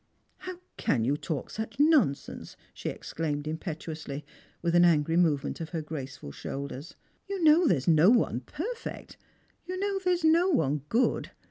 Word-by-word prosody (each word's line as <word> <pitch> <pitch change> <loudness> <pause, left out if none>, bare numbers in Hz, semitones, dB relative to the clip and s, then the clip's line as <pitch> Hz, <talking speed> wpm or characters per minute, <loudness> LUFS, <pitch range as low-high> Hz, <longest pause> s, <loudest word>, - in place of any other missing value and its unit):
"How 370 -1 -8 0.2
can 115 -5 +1
you 140 +4 +2
talk 150 -2 -4
such 220 +2 -5
nonsense?" 290 - +2 0.2
she - - -4
exclaimed 150 -2 -4
im 160 +1 -3
petuously, 155 -4 -6 0.4
with 170 -1 +1
an 175 0 +6
angry 165 -2 +3
movement 160 -4 +1
of 160 - -5
her 165 -3 -3
graceful 135 - -7
shoulders. 140 - -6 0.2
'' - - -40
You 390 -3 -2
know 320 +2 +6
there 170 - +4
is 130 - -6
no 165 +2 +6
one 225 - +3
perfect, 395 - -6 0.5
you 370 +1 -3
know 395 0 -1
there 365 -1 +2
is 345 - -6
no 335 +4 +5
one 150 - +1
good. 245 +3 +1
170 Hz, 170 wpm, -28 LUFS, -, 0.5 s, an